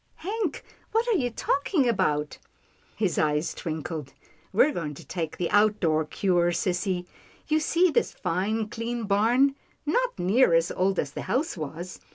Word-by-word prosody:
" - - -41
Hank, 395 -2 -3 0.3
what 455 +2 +2
are 455 - +3
you 255 -9 +1
talking 280 - +1
about? 150 -10 0 0.3
" - - -36 0.2
His 200 -5 0
eyes 150 +1 +1
twinkled. 155 -3 -5 0.2
" 160 +1 -33
We're 265 +9 +4
going 150 - -4
to - - -12
take 165 -4 -4
the 175 - 0
out 210 0 +4
door 160 -3 +2
cure, 175 +1 +1
sissy. 180 0 -1 0.4
You 310 +1 +3
see 340 +3 +3
this 475 - +1
fine, 215 +4 -1
clean 230 +1 -4
barn, 230 +7 +3 0.3
not - - 0
near 190 +2 +4
as 165 0 +2
old 190 +1 +1
as 140 - -1
the - - -5
house 305 +6 0
was. 165 +3 -6
200 Hz, 175 wpm, -26 LUFS, 165-265 Hz, 0.4 s, We're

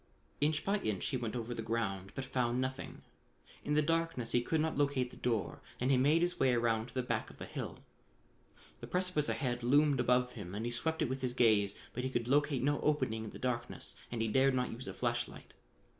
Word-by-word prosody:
Inch 150 +1 +1
by 205 +1 +2
inch 105 - -2
he 130 - 0
went 120 -1 -3
over 120 0 -3
the 115 - -4
ground, 100 -4 -2
but 135 - -3
found 125 -2 0
nothing. 130 0 -4 0.6
In 150 - 0
the 150 - +4
darkness 165 -6 0
he 120 - +3
could 160 +6 0
not 160 +1 0
locate 140 -3 +1
the - - -12
door 115 -3 -1 0.2
and 125 +2 +2
he - - +6
made 150 +6 +4
his 175 0 0
way 130 -2 +4
around 115 -1 +1
to - - -14
the 130 - 0
back - - -2
of - - -14
the - - -6
hill. - - -6 1.0
The - - -8
precipice 180 -5 +1 0.3
loomed 145 +2 +4
above 125 0 +3
him 100 -5 -7
and 110 +2 -3
he 120 - -1
swept 160 +7 -1
it - - +1
with 130 +1 -3
his 125 -1 -1
gaze, 105 -5 +4 0.2
but 125 - -3
he 130 - 0
could 120 -3 -1
locate 145 -1 +2
no 145 +1 +1
opening 130 -7 +1
in - - -5
the - - -9
darkness 120 -1 -3 0.2
and 115 -2 -1
he - - 0
dared 130 +4 +3
not 125 -1 0
use 120 +3 -7
a - - -4
flash - - 0
light. - - -13
125 Hz, 230 wpm, -34 LUFS, 115-145 Hz, 1.0 s, he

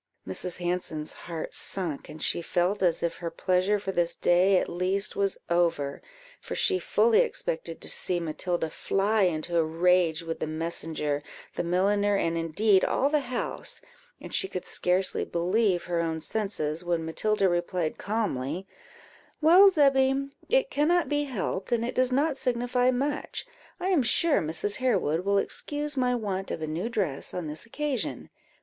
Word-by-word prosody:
Mrs. 170 - -2
Hanson's 175 -3 -3
heart 165 -2 -6
sunk, 170 -7 0
and 155 +1 -7
she - - +1
felt 180 +4 0
as 175 -3 +2
if 170 -1 -1
her 170 -1 -4
pleasure 185 +4 +1
for 195 -1 -4
this 175 -2 0
day 185 +2 +4
at - - 0
least 185 +3 -1
was 200 -1 0
over, 170 -5 0 0.4
for - - -6
she 380 -2 +2
fully 455 +2 +3
expected - - -2
to - - -8
see 180 -1 +2
Matilda 170 0 -2
fly 205 +6 +1
into 170 0 0
a - - +4
rage 170 0 +2
with 165 0 -5
the - - -2
messenger, 155 -2 -2 0.3
the - - -2
milliner, 200 +4 +2
and 165 -3 0
indeed 185 +5 +2
all 280 +2 +1
the 305 - +3
house; 255 -3 -3 0.4
and - - -10
she 385 - +2
could 185 - -5
scarcely 180 +1 +1
believe 185 +2 +1
her 175 -2 -1
own 160 -1 -2
senses, 170 -5 -2
when 170 -2 -1
Matilda 200 +4 +1
replied 175 -2 -1
calmly 190 - -2 0.7
"Well, 350 +6 +8
Zebby, 275 -4 +3 0.2
it - - +2
cannot 335 +5 +2
be 290 0 0
helped, 200 -7 -3
and 235 -1 +1
it 245 - -3
does 255 0 +2
not 280 +2 +1
signify 245 0 +1
much; 280 +4 -2 0.3
I 370 +1 -1
am 360 -7 +3
sure 305 +6 +3
Mrs. 165 +6 -1
Harewood 195 - +1
will 200 +1 +2
excuse 295 +8 -2
my 250 -2 +1
want 195 -4 -3
of - - -3
a - - 0
new 165 +8 -3
dress 185 - -2
on 180 -2 -3
this 155 +8 -6
occasion. 285 0 -3
190 Hz, 165 wpm, -27 LUFS, 170-250 Hz, 0.7 s, Well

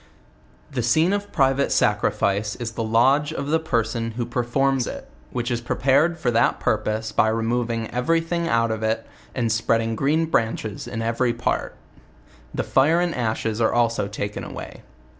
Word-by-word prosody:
The 130 -3 -1
scene 155 - +3
of 205 0 -3
private 135 0 +2
sacrifice 100 +1 +1
is 120 -2 -5
the 115 0 -3
lodge 135 +7 +3
of 140 -2 -4
the 160 +1 +3
person 115 -6 -1
who 120 - -1
performs 125 +2 0
it, - - -7 0.2
which 120 - -3
is 120 -1 -1
prepared 140 +7 +2
for 135 -7 0
that 115 0 +2
purpose 110 0 -1
by - - +3
re 115 +1 0
moving 115 -1 -1
every 125 +7 +1
thing 170 +1 -2
out 115 -6 +2
of 110 -1 -3
it. 110 0 -1 0.3
and 115 -3 0
spreading 115 0 +1
green 155 +6 +1
branches 110 -8 -1
in 115 -1 -4
every 120 +1 +1
part. - - -2 0.8
The - - -2
fire 155 +6 +3
and 175 -1 0
ashes 110 -1 -1
are 110 - +2
also 115 -3 +1
taken 100 0 -4
away. - - -8
120 Hz, 170 wpm, -23 LUFS, 115-140 Hz, 0.8 s, scene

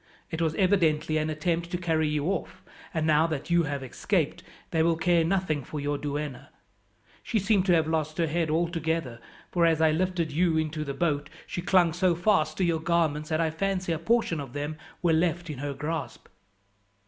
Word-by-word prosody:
"It 160 0 -3
was 160 -1 +1
evidently 165 -6 +2
an 155 +1 -1
attempt 170 +2 -1
to 180 - -2
carry 160 -3 +1
you 150 -1 -1
off, 195 +3 -3 0.3
and 160 -2 -1
now 155 +1 +4
that 155 0 -4
you 170 0 +5
have 140 -2 -3
escaped 130 - -1 0.3
they 160 - +2
will 165 0 +3
care 170 0 +3
nothing 165 -5 0
for 150 - -6
your 145 0 -2
duenna. 145 -2 -4 0.7
She 230 - -1
seemed 200 -1 +2
to 180 - +5
have 160 -1 +3
lost 155 -1 -1
her 170 - +2
head 165 +1 -1
altogether, 160 -5 -1 0.3
for 175 - +2
as 160 -1 +2
I 160 -1 +4
lifted 175 -1 0
you 165 +1 +2
into 155 -1 -1
the 140 -2 -5
boat 145 -2 0 0.2
she 175 - -4
clung 180 -3 +3
so 180 0 +2
fast 165 -4 +2
to 190 - +1
your 170 -2 +1
garments 160 -3 0
that 155 - 0
I 160 -1 +1
fancy 185 +1 -1
a 160 - -1
portion 220 -3 +1
of 135 -4 -7
them 145 +2 -3 0.3
were 170 -2 +4
left 170 0 0
in 140 - -7
her 145 0 -3
grasp." 155 +2 -4
160 Hz, 200 wpm, -27 LUFS, 150-175 Hz, 0.7 s, you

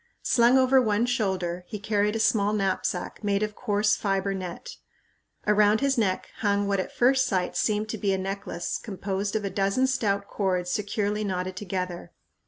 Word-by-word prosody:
Slung 240 +2 +4
over 260 0 +5
one 220 -1 +1
shoulder 190 -7 -1
he 210 - -5
carried 210 0 0
a - - -1
small 210 -1 +2
knapsack 195 -1 -2
made 200 0 +1
of 210 0 -2
coarse 210 -2 +1
fiber 195 -1 -1
net. 185 -3 -7 0.7
Around 210 +1 +4
his 275 -1 +2
neck 200 -6 -1
hung 205 -2 +1
what 200 -1 +1
at 185 - -3
first 260 +1 +3
sight 185 -2 -1
seemed 215 0 0
to 220 - -4
be 200 -1 +1
a 190 - +1
necklace 190 -2 -4
composed 200 0 -3
of 215 -2 -1
a 195 - -2
dozen 200 +6 +1
stout 205 -6 0
cords 180 -3 -1
securely 210 +1 -1
knotted 185 -2 -3
together. 180 -2 -4
205 Hz, 175 wpm, -26 LUFS, 190-215 Hz, 0.7 s, over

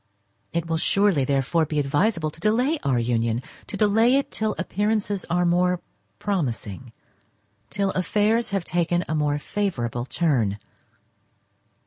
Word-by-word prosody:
It 170 0 -1
will 165 -1 -1
surely, 195 -4 +2
therefore, 140 +4 +1
be 150 - -3
advisable 155 +4 +1
to 160 - -15
delay 250 - +2
our 130 -3 +1
union—to 115 - -2
delay 225 +5 +4
it 280 - -2
till 215 -1 -1
appearances 205 +1 -1
are 180 +1 +2
more 180 +1 +2 0.4
promising—till 115 - -5
affairs 210 +6 +1
have 195 -3 -2
taken 175 0 0
a - - -2
more 150 -1 +1
favourable 135 - -2
turn. 125 - +1
170 Hz, 120 wpm, -24 LUFS, 130-205 Hz, 0.4 s, delay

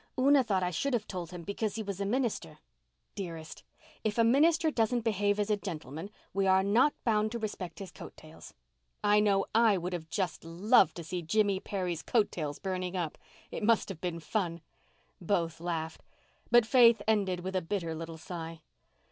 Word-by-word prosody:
"Una 275 +1 +5
thought 195 -5 0
I 180 - 0
should 265 - 0
have 215 -3 -2
told 180 -3 -5
him 175 -1 -8
because 200 +2 -3
he 220 - -3
was 200 -1 -5
a 200 - -1
minister." 230 - -1 0.6
"Dearest, 165 -4 -7 0.4
if 215 0 -1
a 230 - +5
minister 315 +7 +4
doesn't 235 -1 +1
behave 205 -2 +1
as 210 +1 0
a 210 - +3
gentleman 160 -2 -6 0.2
we 195 0 +1
are 190 0 +5
not 235 +9 +3
bound 215 -2 +1
to - - -1
respect 205 -6 -5
his 195 -3 -8
coat - - -11
tails. 155 +1 -13 0.5
I 210 0 +5
know 200 -2 +3
I 225 -3 +5
would 175 -2 -4
just 190 -4 -2
have 165 - -10
loved 185 0 +4
to 170 - -6
see 175 +3 -4
Jimmy 200 +3 +1
Perry's 180 -5 -3
coat 220 -4 +1
tails 150 -4 -4
burning 185 -1 -3
up. 165 -4 -2 0.4
It - - -5
must 225 +1 +2
have 185 -5 -7
been 175 -2 -3
fun." 170 +1 -2 0.6
Both 165 -3 -1
laughed; 165 -2 -3 0.5
but 240 -1 +6
Faith 230 -3 +6
ended 195 -5 +1
with 190 +1 -5
a 185 - +2
bitter 170 -2 -3
little 165 0 -6
sigh. 165 -1 -7
195 Hz, 190 wpm, -30 LUFS, 170-220 Hz, 0.6 s, but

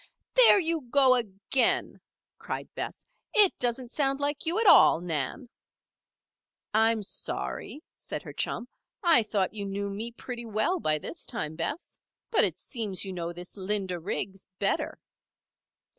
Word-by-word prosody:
"There - - +7
you 330 -2 0
go 265 -1 +5
again!" 220 +1 0 0.4
cried - - -6
Bess. - - -6 0.3
"It 415 -4 +7
doesn't 245 0 -1
sound 275 -1 0
like 290 +2 -2
you 340 +5 +1
at 455 - +1
all, 360 - +7
Nan." 170 - -3 1.3
"I'm 220 0 +3
sorry," 290 - -5
said - - -6
her - - -9
chum. 235 - -2 0.4
"I 335 -8 +6
thought 210 -3 -1
you 205 -2 -4
knew 200 +1 -3
me 220 +4 -4
pretty 240 0 -7
well 220 - 0
by 155 - +1
this 320 - -6
time, 160 -10 -3
Bess. 175 - -4 0.3
But, 450 - +5
it 180 -4 0
seems 205 -3 0
you 190 - -5
know 170 -1 -4
this 175 +1 -8
Linda 190 -2 -1
Riggs 190 +2 -4
better." 200 - -1
220 Hz, 145 wpm, -28 LUFS, 190-275 Hz, 1.3 s, There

